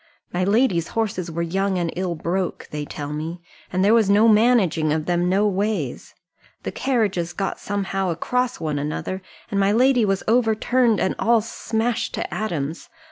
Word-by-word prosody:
My 180 +1 0
lady's 200 -4 +2
horses 195 -6 -2
were 170 +1 -2
young 190 +3 0
and 170 -2 -1
ill 180 -1 -2
broke, 180 +3 -2
they 150 -1 -4
tell 145 0 -6
me, 160 +3 -4 0.3
and 185 +1 +1
there 210 - +5
was 225 -4 +4
no 210 +3 +5
managing 210 -9 +4
of 155 0 0
them 175 +1 +1
no 200 +3 +3
ways. 205 +2 -2 0.5
The - - -3
carriages 200 -10 0
got 195 +2 -3
somehow 195 -2 -2
across 250 +9 -1
one 155 -3 -2
another, 155 +6 -3 0.3
and 200 - 0
my 195 0 +3
lady 250 +2 +4
was 195 -2 0
overturned, 230 0 +2
and 190 - +1
all 230 -1 +3
smashed 230 +1 -2
to - - -4
atoms. 165 -7 -3
195 Hz, 170 wpm, -22 LUFS, 170-220 Hz, 0.5 s, there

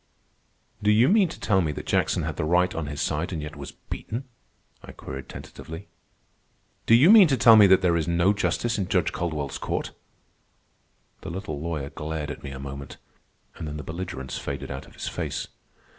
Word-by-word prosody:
"Do 105 - +2
you 110 +4 +5
mean 200 -3 +4
to - - -9
tell 95 -3 +2
me 80 -3 0
that - - -7
Jackson - - +1
had - - -3
the - - -2
right 90 +3 +2
on 80 -2 -3
his 70 0 -5
side 80 +4 -1
and 85 - -3
yet 75 +1 -6
was 70 -1 -8
beaten?" 120 +5 -6 0.6
I - - -11
queried 65 0 -8
tentatively. 80 +5 -9 1.0
"Do 115 - +7
you 145 - +7
mean 215 -5 +9
to 135 -3 +1
tell 115 -1 +8
me 105 -2 +8
that 95 0 +5
there 85 -2 +3
is 80 -1 0
no 85 +3 +3
justice 110 +2 -1
in 95 - -1
Judge 90 -1 +1
Caldwell's 80 -5 -3
court?" - - -3 1.3
The - - -7
little 85 -5 -5
lawyer 80 -4 -4
glared 75 -1 -4
at - - -8
me 70 - -7
a 70 - -7
moment, 70 0 -8 0.6
and 80 - -5
then 75 0 -5
the 75 - -6
belligerence 80 -6 -5
faded - - -5
out 65 0 -7
of - - -18
his - - -6
face. - - -4
85 Hz, 200 wpm, -25 LUFS, 75-100 Hz, 1.3 s, mean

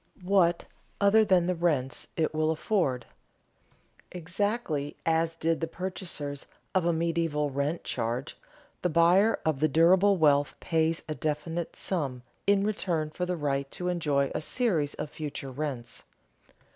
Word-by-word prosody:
What 180 -2 +3 0.3
other 205 +2 +5
than 185 -4 +3
the 180 - +1
rents 155 -7 -1
it 160 -1 +1
will 155 0 +1
afford? 155 - 0 1.1
Exactly 180 -4 -2
as 165 0 +1
did 165 0 0
the 165 - 0
purchasers 165 -6 -5 0.3
of 185 -3 +2
a - - +4
medieval 165 -3 0
rent 140 +5 -1
charge, 120 +3 -3 0.5
the 180 - +1
buyer 175 +7 +4
of 155 -4 +1
the 155 - +3
durable 180 +6 +5
wealth 145 -3 +3
pays 165 0 0
a 155 - -2
definite 155 +3 -3
sum 140 -9 -3 0.2
in 200 -1 +4
return 170 -7 -1
for 180 +3 -3
the 180 -1 -1
right 140 -2 -1
to 180 +4 -3
enjoy 145 -6 +1
a - - -2
series 165 - 0
of 150 - -5
future 145 -3 -6
rents. 130 -3 -5
165 Hz, 145 wpm, -28 LUFS, 145-180 Hz, 1.1 s, other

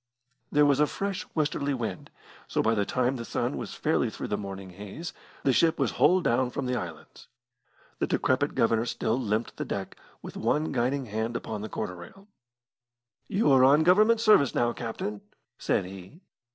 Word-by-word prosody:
There 150 0 +5
was 140 -1 +3
a 150 - +4
fresh 195 +2 -4
westerly 145 -2 0
wind, 110 -7 -5 0.4
so - - 0
by 115 - +3
the 105 -2 +1
time 130 +1 0
the 115 - -5
sun - - -2
was - - -6
fairly - - +1
through - - -6
the - - 0
morning 95 -2 -7
haze, 105 - -8 0.3
the 135 - +3
ship 160 +5 +3
was - - +1
hull 185 +1 +4
down 125 -4 +1
from 125 - -4
the 125 0 -1
islands. 80 -8 -7 0.7
The - - 0
decrepit 130 +3 +1
Governor 115 +1 +2
still 115 +1 -1
limpid 110 -1 -2
the - - -2
deck, - - -4 0.3
with - - -8
one 155 +1 0
guiding 130 +2 0
hand 110 +1 -3
upon 105 -2 -5
the 110 - -5
quarter 100 -4 -4
rail. 195 - -13 1.0
"You 205 -5 +2
are 130 -1 +6
on 145 +4 +6
Government 215 +6 +5
service 210 - +4
now, 120 0 +2
captain," 110 -3 -5 0.4
said - - 0
he. 95 - -11
125 Hz, 180 wpm, -27 LUFS, 105-150 Hz, 1.0 s, are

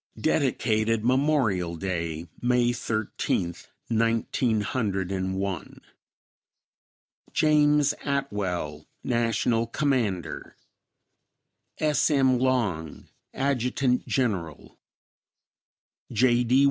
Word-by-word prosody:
Dedicated 110 +1 +1
Memorial 125 - +2
Day, 85 -2 -3 0.2
May 120 0 +2
Thirteenth, 110 -6 -2 0.2
Nineteen 115 0 +1
Hundred 100 -5 -2
and 95 0 -2
One. 95 -2 -4 1.5
James 150 -1 +4
Atwell, 95 - -2 0.2
National 115 -1 +1
Commander. 115 - -1 1.2
S. 150 -1 +2
M. 130 -4 +3
Long, 105 - -1 0.3
Adjt. 125 -1 0
Gen'l. 95 - -2 1.4
J. 120 +1 +3
D. 125 +3 +4
115 Hz, 70 wpm, -26 LUFS, 95-130 Hz, 1.5 s, James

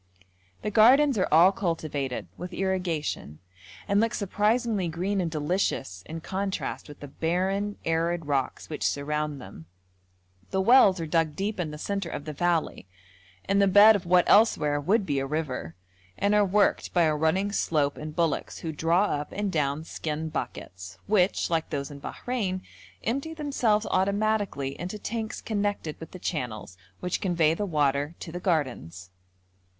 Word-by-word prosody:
The 210 - -2
gardens 260 +6 +6
are 185 - +2
all 170 +5 +7
cultivated, 155 - -3
with 180 +1 -7
irrigation, 180 - -2 0.5
and 200 0 +3
look 230 0 0
surprisingly 210 0 0
green 185 +4 -1
and 170 - -1
delicious 150 - -1
in 165 +1 -6
contrast 195 +3 -3
with 145 - -12
the 145 - -7
barren, 190 +7 -1
arid 165 0 0
rocks 140 -3 -2
which 155 - -6
surround 150 0 -1
them; 80 -9 -11 0.8
the 190 - -1
wells 200 -3 +6
are 165 - -2
dug 160 -1 +1
deep 200 +3 -3
in 170 -3 -1
the 150 - -7
centre 195 +2 -3
of 145 - -6
the 155 - -5
valley, 170 - -1 0.6
in 200 0 +2
the 200 - +5
bed 205 +3 +8
of 180 -4 -4
what 180 0 +4
elsewhere 150 -9 +4
would 200 +7 +2
be 145 -4 0
a 135 - -2
river, 135 - -3 0.4
and 200 +1 +1
are 210 0 +5
worked 200 0 +1
by 175 - +5
a 155 -1 +2
running 160 +7 +1
slope 150 -8 +1
and 155 0 -7
bullocks 165 -2 -1
who 165 - -4
draw 165 +5 +2
up 150 -7 -2
and 205 -1 -2
down 150 -1 0
skin 160 -1 -4
buckets, 90 -10 -6
which, 195 -3 +2
like 165 -1 0
those 140 -1 -3
in 140 - -9
Bahrein, 195 - -3 0.4
empty 275 +8 -2
themselves 245 -8 +1
automatically 200 -6 0
into 185 +4 -4
tanks 220 +1 -4
connected 205 -7 -2
with 160 - -9
the - - -10
channels 125 - -4 0.3
which 180 - -2
convey 170 -4 +2
the 205 +5 -3
water 145 -1 0
to 165 - -7
the 175 - -5
gardens. 120 - -2
175 Hz, 165 wpm, -27 LUFS, 150-200 Hz, 0.8 s, bed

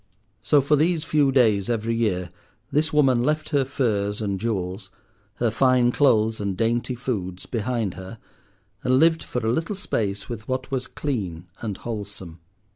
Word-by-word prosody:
So 145 +5 +4
for 145 +3 +3
these 160 +2 +2
few 145 -4 +2
days 110 -7 +3
every 115 -1 0
year 95 -6 0 0.4
this 155 +2 +1
woman 135 -5 +4
left 155 +4 0
her 145 -3 +2
furs 105 -6 -1
and 100 -3 -2
jewels, 95 -3 -3 0.5
her 115 +1 0
fine 125 +1 +3
clothes 110 -6 +3
and 100 -2 -2
dainty 120 +3 0
foods, 95 -8 -4
behind 115 -4 -2
her, 95 +4 -9 0.7
and 130 -1 +3
lived 160 +2 +4
for 125 -2 -4
a 110 - +2
little 165 +9 -1
space 100 - -2
with 110 -2 -7
what 130 +1 -3
was 130 -2 -2
clean 95 - -4 0.2
and 105 -4 -3
wholesome. 100 -7 -7
115 Hz, 160 wpm, -24 LUFS, 100-135 Hz, 0.7 s, So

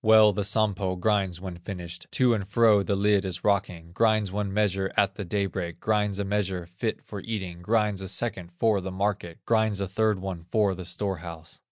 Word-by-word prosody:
Well 110 -1 +7
the 100 +1 -1
Sampo 100 -3 +1
grinds 95 -2 0
when 90 -2 -7
finished, 90 -1 -7
To 125 -2 +4
and 100 -4 -2
fro 105 0 +4
the 100 0 0
lid 100 0 +3
in 95 - -3
rocking, 90 -5 0
Grinds 110 0 +2
one 100 0 -2
measure 95 -2 0
at 100 -1 +3
the 100 - -5
day 100 +2 -1
break, 90 -3 -5
Grinds 105 -2 0
a 100 - -1
measure 95 -3 -1
fit 90 +6 -4
for 100 -2 -7
eating, 95 -6 -5
Grinds 105 0 +1
a 95 - -4
second 95 -4 -1
for 110 -2 +2
the 95 - -5
market, 95 -3 -2
Grinds 110 -3 +2
a 100 - -1
third 110 +2 +1
one 95 -3 -6
for 105 -3 +3
the 90 -1 -7
store 95 +2 -2
house. 80 -1 -10
100 Hz, 205 wpm, -27 LUFS, 90-105 Hz, -, Well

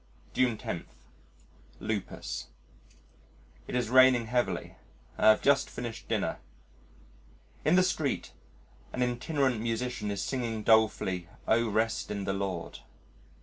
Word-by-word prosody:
June 125 -3 +2
10 85 - -5 0.9
Lupus 105 -3 -4 1.2
It - - -4
is 120 -2 0
raining 130 -2 +6
heavily. 120 +2 -1 0.4
I - - +3
have 110 - +5
just 140 0 +4
finished 120 -2 -6
dinner. - - -1 1.2
In 155 - +4
the 185 - +6
street 155 -6 -1 0.6
an 125 - 0
itinerant 125 0 0
musician 115 -1 -2
is 100 -1 -2
singing 115 -5 -2
dolefully, 105 -6 +2 0.2
"O 115 0 +3
Rest 110 +2 0
in 100 -1 -3
the 95 - -1
Lord." 95 -3 -4
115 Hz, 115 wpm, -30 LUFS, 105-125 Hz, 1.2 s, raining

